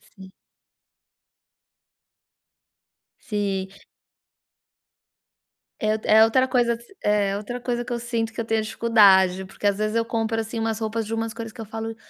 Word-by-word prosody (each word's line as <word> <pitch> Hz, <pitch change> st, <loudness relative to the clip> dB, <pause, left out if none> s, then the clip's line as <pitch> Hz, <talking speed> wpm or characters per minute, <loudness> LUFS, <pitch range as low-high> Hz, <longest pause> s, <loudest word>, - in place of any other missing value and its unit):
Sim. 190 Hz, -2 st, -13 dB, 2.9 s
Sim. 200 Hz, -3 st, -2 dB, 2.1 s
É 215 Hz, 0 st, +1 dB
o 220 Hz, -, -4 dB
é 220 Hz, +1 st, +7 dB
outra 255 Hz, +3 st, +2 dB
coisa 245 Hz, -2 st, +2 dB, 0.3 s
é 200 Hz, -1 st, +1 dB
outra 245 Hz, +4 st, -6 dB
coisa 240 Hz, -1 st, -2 dB
que 245 Hz, -, -4 dB
eu 235 Hz, -, -2 dB
sinto 230 Hz, -1 st, -3 dB
que 230 Hz, -, -3 dB
eu -, -, -5 dB
tenho 220 Hz, -1 st, 0 dB
dificuldade, 195 Hz, -5 st, +4 dB
porque 195 Hz, +2 st, -3 dB
às 200 Hz, -, +1 dB
vezes 215 Hz, +1 st, -1 dB
eu 230 Hz, -, +2 dB
compro, 225 Hz, -1 st, -1 dB
assim, 225 Hz, +1 st, -5 dB
umas 225 Hz, 0 st, -1 dB
roupas 220 Hz, 0 st, -2 dB
de 225 Hz, -, -5 dB
umas 225 Hz, 0 st, -2 dB
coisas 225 Hz, -2 st, -7 dB
que 230 Hz, -, -9 dB
eu -, -, -6 dB
falo: 225 Hz, +1 st, -6 dB
225 Hz, 155 wpm, -24 LUFS, 210-230 Hz, 2.9 s, é